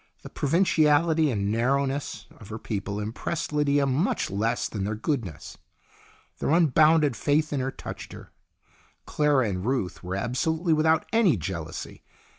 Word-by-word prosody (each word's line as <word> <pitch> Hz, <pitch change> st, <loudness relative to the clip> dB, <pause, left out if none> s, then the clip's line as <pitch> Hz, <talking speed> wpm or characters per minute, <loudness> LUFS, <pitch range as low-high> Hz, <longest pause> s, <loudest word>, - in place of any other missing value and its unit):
The -, -, -10 dB
pro 145 Hz, -, -3 dB
vinciality 160 Hz, -2 st, +3 dB
and 100 Hz, -3 st, -1 dB
narrowness 135 Hz, +4 st, -1 dB
of 105 Hz, -, -13 dB
her 110 Hz, -, -5 dB
people 100 Hz, -2 st, -4 dB
impressed 155 Hz, +10 st, -4 dB
Lydia 145 Hz, -1 st, +2 dB
much 140 Hz, -, 0 dB
less 115 Hz, +4 st, 0 dB
than 100 Hz, -3 st, -4 dB
their 105 Hz, +2 st, -2 dB
goodness. 110 Hz, -, -4 dB, 0.8 s
Their -, -, -1 dB
un 165 Hz, -2 st, +4 dB
bounded 155 Hz, -1 st, +4 dB
faith 150 Hz, +7 st, +1 dB
in 140 Hz, -, 0 dB
her 130 Hz, +1 st, -1 dB
touched -, -, -8 dB
her. -, -, -12 dB, 0.7 s
Clara 145 Hz, -5 st, +2 dB
and 90 Hz, -2 st, -3 dB
Ruth 95 Hz, -8 st, -2 dB
were 90 Hz, +1 st, -4 dB
absolutely 160 Hz, -, 0 dB
without 160 Hz, +1 st, +2 dB
any 210 Hz, -, +4 dB
jealousy. 85 Hz, -2 st, -6 dB
135 Hz, 150 wpm, -26 LUFS, 105-155 Hz, 0.8 s, un